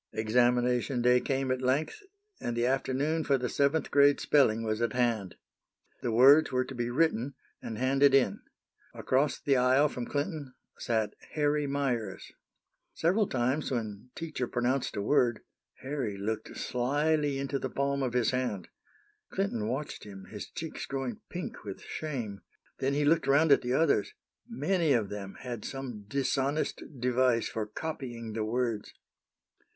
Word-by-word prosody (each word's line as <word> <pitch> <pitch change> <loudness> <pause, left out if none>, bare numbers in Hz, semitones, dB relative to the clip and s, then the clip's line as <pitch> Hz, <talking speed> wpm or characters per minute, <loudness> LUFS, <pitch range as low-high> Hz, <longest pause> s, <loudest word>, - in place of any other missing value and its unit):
Examination 120 +3 +2
day 125 0 +5
came 135 0 -1
at 130 0 -1
length, 140 - 0 0.4
and 120 -1 -3
the 120 - +2
afternoon 135 +5 0
for 140 -2 +2
the 125 -1 -2
seventh 140 +4 +1
grade 145 0 +5
spelling 115 -6 +3
was 110 0 -1
at 115 -2 0
hand. 115 -7 0 0.7
The 120 - -1
words 135 +7 +7
were 130 0 +1
to 135 - -8
be 120 -1 -2
written, 140 -1 +1 0.3
and 110 - -5
handed 135 +2 +4
in. 125 -8 +3 0.6
Across 140 +3 +1
the 140 -2 +3
aisle 130 +4 +4
from 125 -3 -5
Clinton 145 -3 -3 0.2
sat 110 -3 0 0.2
Harry 150 -1 +1
Meyers. 125 -8 -2 0.6
Several 190 +5 +2
times 130 +4 0
when 110 -2 -4
teacher 155 -6 -3
pronounced 125 +3 -1
a 100 - -2
word, 120 -2 +2 0.4
Harry 130 -7 -3
looked 110 +2 -4
slyly 145 +3 0
into 140 0 -2
the 130 - -3
palm 140 +2 -1
of 125 -2 -1
his 125 0 +2
hand. 120 -8 -2 0.6
Clinton 190 - -1
watched 135 +6 -4
him, 95 -2 -10
his 105 -2 -7
cheeks 165 -1 -6
growing 135 -4 -4
pink 180 0 -6
with 100 -2 -7
shame. 120 -11 -5 0.4
Then 135 +1 0
he 145 0 +1
looked 165 +3 +3
around 145 +3 +4
at 140 - +6
the 125 +1 -1
others. 140 -7 +2 0.3
Many 185 -9 +1
of 110 -5 +1
them 100 -2 -6
had 120 -4 -5
some 125 -6 -6
dishonest 140 +4 0 0.2
device 125 -1 +2
for 110 -1 -3
copying 120 -5 -5
the 110 0 -1
words. 115 -1 -2
130 Hz, 155 wpm, -30 LUFS, 115-140 Hz, 0.7 s, words